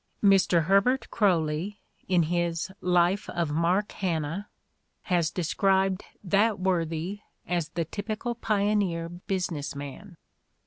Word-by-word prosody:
Mr. 190 -4 +5
Herbert 200 - +2
Croly, 175 -1 +1 0.3
in 180 -2 +3
his 170 +2 -1
life 180 +3 +2
of 170 -3 -1
Mark 175 +6 +1
Hanna, 170 +1 -2 0.6
has 175 -4 +1
described 190 +2 +1 0.2
that 205 +2 +2
worthy 175 +1 -1 0.3
as 170 -3 -1
the 170 +1 -2
typical 215 +7 -4
pioneer 200 -6 0
business 175 -5 -3
man. 145 +7 -8
180 Hz, 105 wpm, -27 LUFS, 165-200 Hz, 0.6 s, Mr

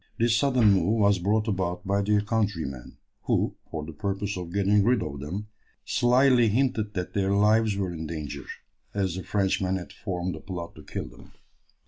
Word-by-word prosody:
This 115 0 +3
sudden 125 -5 +4
move 100 +4 +2
was 100 -3 +4
brought 105 +4 +1
about 95 -3 -2
by 100 +1 +1
their 105 +1 +2
countrymen, 100 - -2 0.3
who, - - +1 0.2
for 75 -1 -4
the 80 - -8
purpose 100 +4 -3
of 90 -2 -6
getting 100 +1 +3
rid 120 +2 +3
of 70 -2 -5
them, 90 +9 -5 0.4
slily 125 0 +4
hinted 110 -2 0
that 90 0 -3
their 100 -2 +1
lives 105 0 +3
were 95 -3 -2
in 80 -1 -5
danger, 75 -4 -5 0.5
as 95 -3 0
the 95 - -4
Frenchmen 95 -2 0
had 90 -2 -6
formed 90 -3 -3
a - - -8
plot 90 -3 -6
to - - -12
kill - - -5
them. - - -16
100 Hz, 180 wpm, -27 LUFS, 90-110 Hz, 0.5 s, sudden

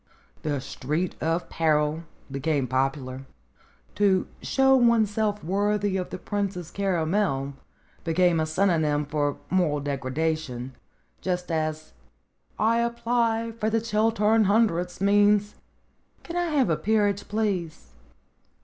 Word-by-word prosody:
The 145 -2 -1
Street 150 +6 -3
of 165 +2 0
Peril 155 0 +1 0.3
became 140 0 0
popular. 130 +1 -2 0.7
"To 195 -3 +2 0.2
show 265 0 +3
oneself 220 -4 +2
worthy 205 +2 0
of 185 -1 -2
the - - -5
Princess 190 -4 -3
Caramel" 175 -6 0 0.5
became 175 0 +2
a 155 - 0
synonym 155 -4 +1
for 145 -1 -1
moral 175 -6 +2
degradation, 140 -1 -3 0.5
just 180 -1 -2
as 155 -1 -2 0.6
"I 225 +2 +2
apply 235 -1 0
for 215 0 +1
the 225 +1 +1
Chiltern 220 0 +2
Hundreds" 190 -4 +1
means 205 +1 +3 0.7
"Can 340 - -7
I 350 0 +1
have 290 - +1
a 155 - +1
peerage, 205 -2 +1
please 185 - -2
180 Hz, 115 wpm, -26 LUFS, 155-210 Hz, 0.7 s, show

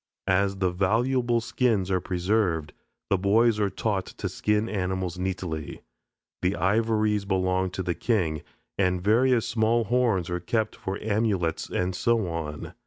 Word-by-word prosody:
As 95 +1 +2
the 95 -2 +1
valuable 120 +6 +1
skins 110 -5 0
are 90 - +2
preserved, 90 -4 0 0.4
the 100 - +3
boys 110 +3 +3
are 100 -1 +2
taught 95 0 -2
to - - -5
skin 105 +1 0
animals 95 -3 -2
neatly. 90 -5 -4 0.6
The 90 +2 +1
ivories 105 +2 +1
belong 95 -1 0
to 95 +1 -4
the 90 -1 -1
king, 85 -9 0 0.4
and 90 -2 +2
various 115 +5 +3
small 115 0 +2
horns 110 -6 +1
are 90 - -1
kept 110 +5 -1
for 95 +1 -4
amulets, 100 -6 0
and 90 0 -1
so 115 0 +1
on. 80 -3 -5
100 Hz, 145 wpm, -26 LUFS, 90-110 Hz, 0.6 s, the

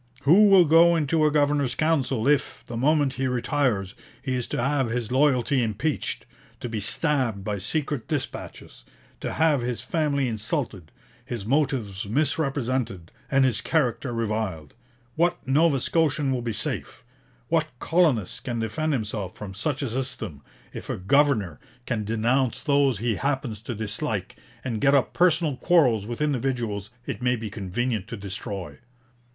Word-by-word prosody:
Who 190 +9 +7
will 195 -3 +7
go 165 +2 +6
into 155 0 +2
a - - +1
Governor's 145 -4 +2
Council 140 -6 +1
if, 145 -1 +1
the 120 - -7
moment 145 +2 +2
he 135 0 -1
retires, 125 -6 0 0.3
he 130 0 -3
is 125 -2 -2
to - - -3
have 135 0 +1
his 120 -1 -3
loyalty 130 -1 +3
impeached; 120 +7 -2 0.3
to - - -4
be 115 -2 -3
stabbed 125 -3 0
by 105 0 -2
secret 140 - -2
dispatches; 145 - -5 0.4
to - - -4
have 155 -5 +3
his 120 -1 -3
family 145 -5 0
insulted; 110 - -3 0.3
his 115 -5 -5
motives 115 -7 0
misrepresented, 130 - -1 0.2
and 135 -2 +4
his 130 - +1
character 135 -4 0
reviled? 110 -9 -3 0.4
What 175 +1 +2
Nova 145 +1 +3
Scotian 150 -1 +1
will 130 -2 -1
be 120 -1 -2
safe? - - -3 0.5
What - - +2
colonist 155 - +1
can 120 -2 -2
defend 150 +8 -1
himself 105 -6 -3
from 100 -2 -7
such 130 +8 -2
a 135 - -2
system, 110 - -4 0.3
if - - -8
a - - -2
governor 105 - +2 0.3
can 110 -5 -2
denounce 115 +3 0
those 140 -5 +3
he 115 0 -1
happens 135 -7 -2
to 120 +1 -5
dislike 110 -1 -3 0.3
and 115 -5 -3
get 140 +1 +5
up 135 - +2
personal 165 -5 +2
quarrels 125 - +3
with 120 +4 -5
individuals 120 -8 -1 0.2
it - - -5
may 125 0 +2
be 110 -3 -6
convenient 105 +2 -2
to 115 - -6
destroy?' 95 -1 -6
125 Hz, 155 wpm, -25 LUFS, 110-145 Hz, 0.5 s, Who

